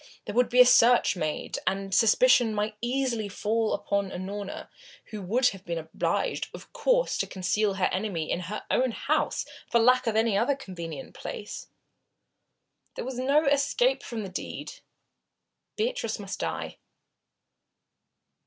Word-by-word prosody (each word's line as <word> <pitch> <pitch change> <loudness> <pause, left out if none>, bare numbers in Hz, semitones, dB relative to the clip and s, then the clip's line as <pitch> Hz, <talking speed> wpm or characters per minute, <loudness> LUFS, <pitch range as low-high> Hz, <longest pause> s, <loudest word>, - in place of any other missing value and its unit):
There - - -5
would 245 +1 +3
be 250 +1 +2
a 250 - +10
search 245 -2 +5
made, 155 -4 -3
and 195 0 -1
suspicion 225 +1 +5
might 210 +1 -1
easily 240 -3 -1
fall 220 +2 0
upon 200 -1 -1
Unorna, 195 +2 -6 0.4
who 215 -2 -5
would 240 +7 +2
have 195 -2 -10
been 170 -2 -3
obliged, 160 0 -2
of - - -13
course, - - +1
to - - 0
conceal 200 +2 0
her 190 -1 +1
enemy 185 -5 -2
in - - 0
her 185 +4 -5
own 255 -2 +2
house - - 0 0.2
for 235 - +3
lack 255 +2 +4
of 220 - +1
any 220 -1 +2
other 245 +7 +2
convenient 170 - -8
place. 210 - -7 1.3
There - - -5
was 255 -1 -5
no 280 +4 +3
escape 285 - +2
from 225 -3 -5
the 195 - -6
deed. 185 - -6 1.0
Beatrice - - -1
must - - -6
die. - - -4
220 Hz, 145 wpm, -27 LUFS, 195-255 Hz, 1.3 s, a